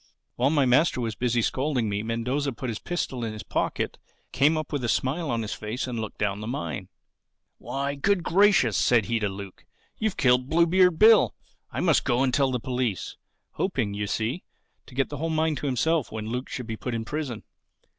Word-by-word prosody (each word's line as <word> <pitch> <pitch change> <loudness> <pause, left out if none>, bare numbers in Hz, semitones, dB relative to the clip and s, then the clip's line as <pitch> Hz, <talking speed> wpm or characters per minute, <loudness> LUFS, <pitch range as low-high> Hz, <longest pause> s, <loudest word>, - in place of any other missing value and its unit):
"While 125 +3 +2
my 145 -3 +3
master 130 +3 +3
was 115 -2 -2
busy 120 +1 0
scolding 130 -3 0
me 100 0 -1
Mendoza 125 +5 -1
put 125 +1 -5
his 110 - -5
pistol 135 -8 -3
in 110 -1 -3
his 110 0 -7
pocket, - - -2 0.3
came 150 +4 +3
up 155 -1 -4
with 140 -3 -1
a 120 - 0
smile 140 +7 0
on 115 -2 -1
his 110 - -4
face 110 +5 -4
and 125 -3 -4
looked 110 -1 -5
down 100 -1 -1
the 110 - -5
mine. 85 - -4 0.7
"'Why, 140 +1 -3
Good 180 +6 +1
Gracious!' 185 - +4
said 120 -4 +3
he 115 -1 0
to 105 -2 0
Luke, 95 -1 -9 0.4
'You've 220 -3 -1
killed 125 0 +3
Bluebeard 170 +1 +4
Bill. 220 +2 +6 0.3
I - - -3
must - - +3
go 120 +2 +2
and 130 -2 +1
tell 135 +1 +3
the 125 -1 -1
police'—hoping, 125 - -3
you 105 0 -3
see, 115 - -2 0.4
to 125 - -14
get 135 0 +1
the 145 - -5
whole 165 +4 -2
mine 160 0 +1
to 145 - -3
himself 145 +3 +1
when 110 -1 -5
Luke 125 +2 -3
should 125 - -5
be 110 -1 -5
put 125 +1 -4
in 115 -1 -3
prison. 140 -5 -4
125 Hz, 205 wpm, -26 LUFS, 115-150 Hz, 0.7 s, Bill